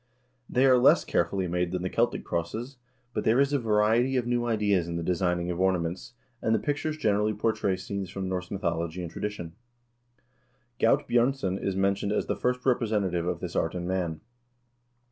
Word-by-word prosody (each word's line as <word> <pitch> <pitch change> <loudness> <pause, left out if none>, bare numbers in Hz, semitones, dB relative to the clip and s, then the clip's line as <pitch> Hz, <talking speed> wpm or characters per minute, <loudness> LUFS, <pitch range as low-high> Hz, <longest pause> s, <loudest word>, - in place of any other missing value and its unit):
They 130 +1 +3
are 130 -2 +6
less - - +5
care 85 - +2
fully 95 +1 -2
made 90 0 -1
than 90 -1 -2
the 90 - -1
Celtic 120 +1 +1
crosses, 110 +10 -3 0.4
but 105 - -1
there 115 +4 +3
is 140 +1 +3
a 140 - +3
variety 115 +3 +2
of 125 - 0
new 120 0 0
ideas 105 -6 +1
in 85 - -4
the 85 - -2
designing 90 0 0
of 85 - -4
ornaments, 95 +5 -1 0.3
and 110 - +2
the - - +1
pictures 150 +1 -2
generally 105 -5 +1
portray 105 -2 0
scenes 95 0 -5
from 95 0 -4
Norse 90 -1 -3
mythology 85 -2 -2
and 85 - -6
tradition. 85 -4 -5 1.3
Gaut 115 - +3
Bj0rnson 120 -6 +1
is 100 - -1
men 95 +1 +3
tioned 100 +1 -3
as - - 0
the - - -1
first 125 0 -1
representative 105 -9 +1
of 90 -1 -2
this 90 -2 -5
art 80 +2 0
in 90 -1 -3
Man. 90 -4 -2
100 Hz, 190 wpm, -27 LUFS, 90-115 Hz, 1.3 s, are